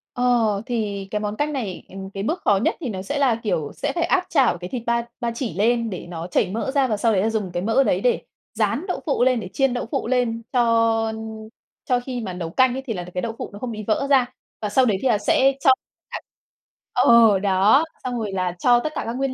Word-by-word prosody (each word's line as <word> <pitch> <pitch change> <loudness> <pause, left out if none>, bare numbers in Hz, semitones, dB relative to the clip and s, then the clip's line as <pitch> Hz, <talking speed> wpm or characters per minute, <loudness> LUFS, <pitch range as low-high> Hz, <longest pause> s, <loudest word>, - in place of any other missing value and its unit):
Ờ, 245 -1 +3 0.3
thì 205 -5 -3
cái 210 0 -1
món 210 0 -3
canh 295 +3 -1
này, 210 -10 -4
ừm, 190 0 -8
cái 195 0 -5
bước 325 +10 -2
khó 205 -2 +3
nhất 210 - +1
thì 270 -7 -4
nó 190 -3 -4
sẽ, 285 +9 -3
là 255 -5 +3
kiểu, 155 -8 -1
sẽ - - -2
phải 340 - +1
áp 360 +1 +1
chảo 260 - +3
cái 180 +1 -7
thịt 240 -3 -4
ba 235 0 0
ba 235 -2 -1
chỉ 235 - -3
lên 230 +4 +1
để 180 -2 -7
nó 170 0 -6
chảy 180 - +1
mỡ 230 +5 -2
ra 275 -2 +2
và 215 -3 -1
sau 225 +1 +2
đấy 200 +3 +2
dùng 210 -5 -2
cái 175 +1 -3
mỡ 230 +6 +3
đấy - - +1
để - - +2 0.3
rán 230 - 0
đậu 360 - -2
phụ 275 -5 +1
lên, 255 -2 +3
để 200 - -6
chiên 270 -2 +2
đậu 245 - -3
phụ - - -1
lên 240 -2 0
cho 230 -2 +2 0.7
cho 250 -1 +2
khi 245 -1 -5
mà 190 -4 -5
nấu 170 -2 -5
canh 255 +6 +3
ấy 265 - -5
thì 230 - -2
là 175 -2 -5
cái 180 - -2
đậu 225 -1 -4
phụ - - -5
nó 205 - -9
không 245 -1 -4
bị 215 -1 -6
vỡ 275 +6 +1
ra. 265 -3 +5 0.4
Và 210 - -2
sau 255 +5 +3
đấy 205 -5 +2
là 240 -5 +3
thì 205 - -11
sẽ 270 +1 +4
cho 270 - +3 0.4
cả - - -4 0.7
ờ, 225 -4 +6
đó 200 +8 +4 0.2
xong 245 -2 -3
rồi 210 -3 -3
là 180 -2 -1
cho 245 -1 +4
tất 310 +4 -4
cả - - -1
các 230 - -3
nguyên 270 -1 -1
230 Hz, 260 wpm, -22 LUFS, 200-255 Hz, 0.7 s, ờ